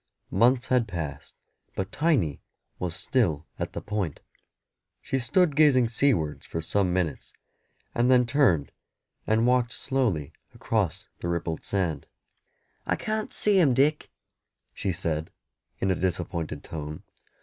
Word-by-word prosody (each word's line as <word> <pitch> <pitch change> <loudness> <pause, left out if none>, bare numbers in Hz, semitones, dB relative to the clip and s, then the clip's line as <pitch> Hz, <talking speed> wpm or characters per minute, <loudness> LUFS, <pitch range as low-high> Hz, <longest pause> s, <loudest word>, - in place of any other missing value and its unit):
Months 125 +2 +3
had 125 -3 +3
passed, 80 -7 -6 0.4
but 95 +1 -3
Tiny 130 - +1 0.4
was 90 -2 -3
still 85 - 0
at - - -3
the - - -4
Point. 100 -8 -3 0.8
She 135 - -2
stood 165 +4 +2
gazing 135 -6 +5
seawards 110 - +1
for 80 - -3
some 90 +3 +1
minutes, 90 -6 -2 0.6
and 120 +1 +2
then 125 -1 +5
turned 120 - +2 0.6
and 110 +1 +3
walked 125 -1 +2
slowly 115 - -1 0.2
across 100 -5 -1
the - - -4
rippled 85 -1 -2
sand. 90 -6 -1 0.8
"I - - +2
can't 215 0 -3
see 205 -2 +3
him, 140 -8 +4
Dick," 150 +4 +2 0.6
she 95 - -2
said, 80 -2 -2 0.5
in 95 - +1
a - - +2
disappointed 85 -4 -2
tone. 75 -1 -6
100 Hz, 130 wpm, -27 LUFS, 85-130 Hz, 0.8 s, gazing